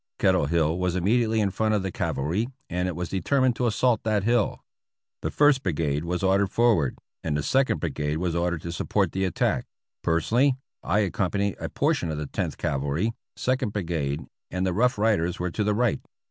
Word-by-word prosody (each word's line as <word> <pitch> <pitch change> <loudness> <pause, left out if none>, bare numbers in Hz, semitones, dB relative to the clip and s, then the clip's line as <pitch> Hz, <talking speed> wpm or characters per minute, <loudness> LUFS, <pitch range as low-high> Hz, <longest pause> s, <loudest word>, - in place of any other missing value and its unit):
Kettle 70 - +3
Hill 80 +1 +1
was 90 -1 0
immediately 110 +4 +2
in 100 -2 +1
front 110 +3 +1
of 100 - 0
the 95 - -2
Cavalry, 85 - -1 0.2
and 90 +1 0
it 90 - -3
was 90 +1 -3
determined 130 +5 +1
to 125 - +1
assault 115 0 +2
that 105 -3 0
hill. 115 -1 +1 0.6
The - - -1
First 145 -2 +4
Brigade 75 -3 -1
was 90 +2 -2
ordered 95 +1 +3
forward, 110 - +2 0.3
and 75 -2 0
the 75 - -2
Second 135 - +2
Brigade 75 -2 -2
was 85 0 -1
ordered 85 -2 -1
to 85 - -4
support 85 - 0
the 95 0 0
attack; 90 - 0 0.3
personally, 120 - +2 0.3
I 105 - +1
accompanied 100 +1 0
a - - -4
portion 85 - 0
of 80 - -3
the 75 - -3
Tenth - - -3
Cavalry, 70 +11 -1 0.2
Second 130 -4 0
Brigade, 80 -8 -2 0.2
and 90 +1 -1
the 95 - 0
Rough 125 +5 +2
Riders 100 -6 +1
were 90 0 -2
to 105 - -1
the 105 0 +1
right. 120 0 +1
95 Hz, 190 wpm, -26 LUFS, 85-110 Hz, 0.6 s, First